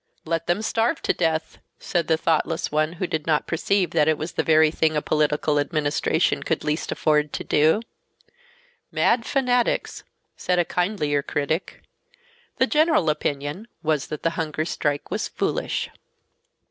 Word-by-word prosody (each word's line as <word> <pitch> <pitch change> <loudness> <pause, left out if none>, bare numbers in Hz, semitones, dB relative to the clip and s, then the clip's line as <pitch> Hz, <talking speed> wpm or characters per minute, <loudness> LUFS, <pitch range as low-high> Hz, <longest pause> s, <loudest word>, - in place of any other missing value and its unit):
"Let 165 0 -2
them 175 +5 0
starve 230 +7 0
to - - +2
death," 160 -2 -1 0.2
said 170 -1 -1
the 160 - +3
thoughtless 165 0 0
one, 155 +2 +1
who 180 +2 -3
did 160 -3 -3
not 155 -2 +2
perceive 185 +3 0
that 155 -3 +3
that 155 0 +2
was 160 +3 -4
the - - 0
very 155 -1 +4
thing 155 -1 +1
a - - +3
political 150 0 +1
administration 145 -1 0
could - - -1
least 150 +2 -2
afford 150 -1 +1
to - - -3
do. 155 +8 +3 1.1
"Mad 230 -1 +2
fanatics," 250 -3 0 0.3
said 180 - -1
a 175 - +3
kindlier 175 -7 0
critic. 150 +5 -3 0.7
The 260 - +4
general 305 - +3
opinion 145 +6 -3 0.2
was 155 -3 0
that 150 - -6
the 165 - +2
hunger 155 -1 -2
strike 145 -3 -2
was - - -1
"foolish." - - -2
160 Hz, 155 wpm, -24 LUFS, 150-180 Hz, 1.1 s, very